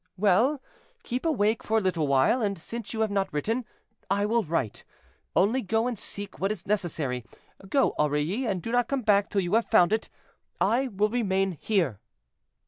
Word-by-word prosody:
"Well, 215 +9 +3 0.4
keep 255 - -2
awake 220 -7 +1
for 220 - 0
a - - +2
little 175 -6 0
while, 140 - +3
and, 200 -3 -1
since 225 +6 -6
you 225 - -2
have 220 -2 +1
not 195 -1 0
written, 225 +11 -1 0.4
I 200 +1 +1
will 230 +2 +2
write; 155 - -2 0.5
only 225 +7 +3
go 225 +2 0
and 250 -1 -1
seek 205 0 -5
what 195 +2 0
is 185 -5 -5
necessary. 160 - -1 0.5
Go, 275 +4 +2
Aurilly, 150 - 0
and 190 -5 -2
do 230 - -4
not 245 -1 +2
come 275 -2 -2
back 205 -2 +3
till 200 - +1
you 175 +1 -3
have 230 +1 +3
found 195 -2 +5
it; 220 - -1 0.5
I 260 +4 +2
will 210 -2 0
remain 195 -5 +1
here." 170 - 0
205 Hz, 185 wpm, -27 LUFS, 180-230 Hz, 0.5 s, found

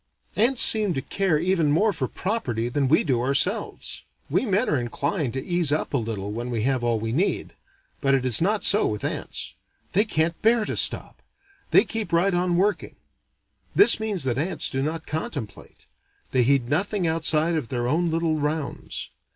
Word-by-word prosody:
Ants 240 +4 +5
seem 210 -6 +6
to 135 - -2
care 190 -3 0
even 170 -2 +1
more 205 +8 +2
for 135 -7 -2
property 120 - -3
than 135 +2 0
we 155 - +3
do 130 -6 0
ourselves. 140 - -1 0.3
We 260 - +1
men 205 +5 +1
are 145 - +1
inclined 140 - -2
to 130 - -5
ease 175 -4 +1
up 150 - -2
a - - +2
little 110 -4 -4
when 120 +3 -5
we 115 -3 -2
have 130 -1 0
all 120 -2 0
we 110 +1 -3
need. 170 - -1 0.5
But 135 -1 +3
it 130 -2 +1
no 205 +5 +1
so 205 +2 +4
with 105 -1 -4
ants: - - -4 0.4
they 200 +4 +4
can't 165 -5 -1
bear 225 0 +3
to - - -4
stop: - - 0 0.5
they - - +5
keep 220 -7 -5
right 175 +3 +2
on 175 0 0
working. 205 +3 -1 0.8
This 405 - +6
means 210 -7 -1
that 130 -1 -1
ants 175 +5 0
do 135 - -2
not 160 +3 -3
contemplate: 145 -7 -6 0.5
they 130 - +2
heed 130 0 +2
nothing 185 - -1
outside 160 0 +2
of 155 -8 -3
their 120 -1 -2
own 165 +6 0
little 165 -1 0
rounds. 150 0 -4
155 Hz, 185 wpm, -24 LUFS, 130-185 Hz, 0.8 s, seem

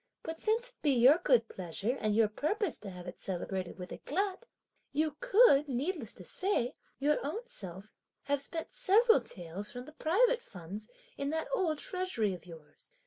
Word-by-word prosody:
But 325 0 -5
since 455 +3 +1
it - - -25
be 290 -3 +3
your 260 +6 +6
good 245 -9 +3
pleasure 195 +7 -3
and 215 -1 +1
your 225 -1 +5
purpose 320 - -1
to 205 - -7
have 180 -1 -9
it 180 - -8
celebrated 185 0 -4
with 180 -1 -8
éclat, 390 - -2 0.5
you 305 0 0
could, 300 - +5
needless 295 +8 -2
to - - -9
say, 370 -11 0 0.2
your 295 +2 +1
own 415 - -3
self 195 - -7 0.3
have 285 -1 0
spent 325 - -4
several 455 0 +5
taels 180 +3 -5
from 245 0 -7
the 305 - -11
private 470 +11 +3
funds 195 - -9 0.3
in 280 0 -1
that 320 +1 -1
old 340 -10 +1
treasury 365 - -1
of 180 0 -10
yours! 160 -3 -11
280 Hz, 175 wpm, -32 LUFS, -, 0.5 s, your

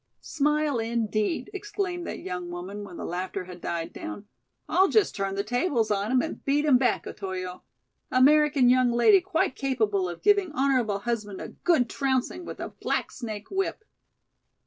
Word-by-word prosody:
"Smile 300 -3 0
indeed," 225 - -1
exclaimed 390 -3 -3
that - - -4
young 180 -1 -5
woman 185 +4 -6
when 195 -4 -9
the - - -5
laughter 185 +2 -3
had 180 -1 -11
died 165 -1 -3
down; 320 -11 -7 0.4
"I'll 380 +2 +4
just 430 +1 +2
turn 195 -1 -2
the 200 - -1
tables 245 - 0
on 205 +2 0
him 255 -1 +3
and 320 - -6
beat 290 +2 +1
him 265 -5 +5
back, 255 - +1
Otoyo. 185 -2 -5 0.5
American 285 0 +5
young 250 0 +4
lady 365 - +5
quite 350 -7 0
capable 215 -9 0
of 175 - -8
giving 405 -4 +4
honorable 255 -7 +1
husband 210 -2 -3
a - - -6
good 320 -9 +1
trouncing 270 +7 -1
with - - -8
a - - -4
black - - -2
snake 215 -4 -7
whip." 390 +2 -2
245 Hz, 170 wpm, -27 LUFS, 200-305 Hz, 0.5 s, him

